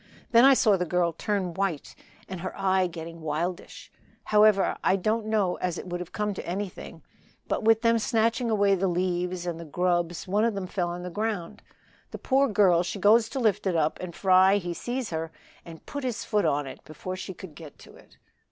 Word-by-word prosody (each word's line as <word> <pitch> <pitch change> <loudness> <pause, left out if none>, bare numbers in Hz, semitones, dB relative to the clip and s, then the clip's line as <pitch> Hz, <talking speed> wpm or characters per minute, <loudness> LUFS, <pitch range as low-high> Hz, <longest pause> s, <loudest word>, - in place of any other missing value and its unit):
Then 235 +2 +7
I 270 0 +7
saw 210 -5 +4
the 180 - -1
girl 175 0 0
turn 190 0 -2
white 190 -5 -3 0.3
and 185 -2 -7
her 185 +1 -6
eye 190 -1 +2
getting 165 -1 -9
wildish; 160 +4 -4 0.3
however, 210 -2 +4
I 190 - +3
don't 215 +3 -1
know 205 -5 +1
as 180 -1 -2
it - - -7
would 175 -1 -4
have 180 -1 -7
come 210 -1 -2
to - - -7
anything, 190 +2 -6 0.4
but - - -1
with 225 +1 +3
them 230 0 +3
snatching 230 +1 +1
away 205 -2 +3
the 195 0 +1
leaves 180 0 -1
and 170 -2 -4
the - - -7
grubs 175 +2 -1
one 205 +3 +1
of 230 -2 +1
them 195 -2 -3
fell 180 -1 -2
on 175 +1 -6
the 180 - -6
ground. 210 -3 -3 0.5
The - - -7
poor 275 +1 +2
girl 195 -6 +4
she 180 +3 -4
goes 220 +3 +4
to 270 - -4
lift 210 -4 +1
it 180 - 0
up 155 -1 0
and 180 -2 -7
Fry 190 +1 +5
he 175 -3 -4
sees 245 +4 -4
her 160 0 -3 0.3
and 165 -2 -12
put 285 -1 -6
his 240 -3 -3
foot 210 -2 +1
on 145 0 +1
it 135 - -10
before 185 +4 -7
she 185 0 -7
could 185 -4 -11
get 155 -2 -12
to - - -16
it." - - -20
185 Hz, 215 wpm, -26 LUFS, 175-215 Hz, 0.5 s, Then